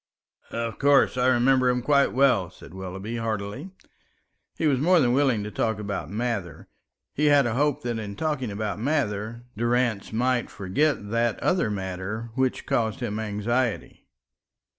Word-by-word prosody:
"Of 115 -1 -4
course, 140 -1 +4
I 125 0 +2
remember 130 +1 +4
him 125 -1 0
quite 140 0 +3
well," 125 -9 +3
said 90 - -14
Willoughby, 95 +4 -6
heartily. 110 - -4 0.9
He - - -1
was 140 -4 +3
more 175 +5 +4
than 125 -5 +3
willing 130 -6 +2
to 105 - -6
talk 110 -1 -1
about 100 -7 -4
Mather; 105 -5 -3 0.5
he 150 - 0
had 145 -2 +5
a 120 - 0
hope 145 +3 +1
that 120 -2 -2
in 100 -2 -6
talking 150 -2 -2
about 105 0 -3
Mather, 115 -4 -1
Durrance 120 -2 0
might 125 +2 0
forget 105 +3 -1
that 115 0 +1
other 180 -10 +1
matter 100 +3 -4
which 130 +1 -1
caused 110 -2 0
him 110 -4 -3
anxiety. 110 +3 -2
115 Hz, 155 wpm, -25 LUFS, 105-130 Hz, 0.9 s, had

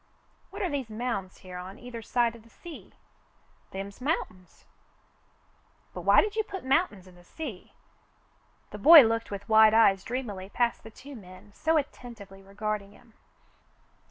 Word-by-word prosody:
"What 400 +1 -6
are 365 - 0
these 270 -5 -3
mounds 215 -4 -4
here 180 -1 -7
on 190 +3 -9
either 245 -2 -9
side 235 +1 0
of 230 - -14
the 230 - -21
sea.'' 335 +6 -12 0.7
"Them's 195 +3 -8
mountains." 185 - -4 1.3
"But - - -6
why - - +6
did 420 0 -3
you 440 - +2
put 385 -7 -8
mountains 265 - +1
in 185 - -16
the 175 0 -18
sea?" 235 - -8 1.0
The 210 - -8
boy 310 +5 +10
looked 230 0 -1
with 200 0 -7
wide 220 0 +6
eyes 195 -4 +5
dreamily 210 -7 -5
past 235 +2 0
the 225 - -11
two 275 +5 -12
men 190 -1 -14
so 320 +7 +1
attentively 235 -9 -6
regarding 200 +1 -5
him. 225 - -21
225 Hz, 155 wpm, -28 LUFS, 195-260 Hz, 1.3 s, boy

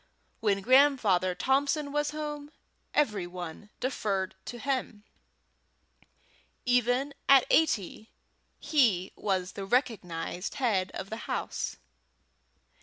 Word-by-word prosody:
When 200 -3 +1
Grandfather 230 -8 +4
Thompson 280 - +1
was 295 0 0
at 305 - -8
home, 295 -1 -5 0.4
every 210 -11 +1
one 175 +3 -8
deferred 200 -7 -1
to 240 - -6
him. 255 -5 -3 1.6
Even 250 +3 +2 0.2
at 275 -2 +8
eighty 220 - +1 0.5
he 220 - +2
was 190 -2 -1
the 195 - -6
recognized 195 - -1
head 210 -8 +1
of 195 +2 -6
the 220 - -3
house. - - -3
230 Hz, 105 wpm, -29 LUFS, 190-275 Hz, 1.6 s, at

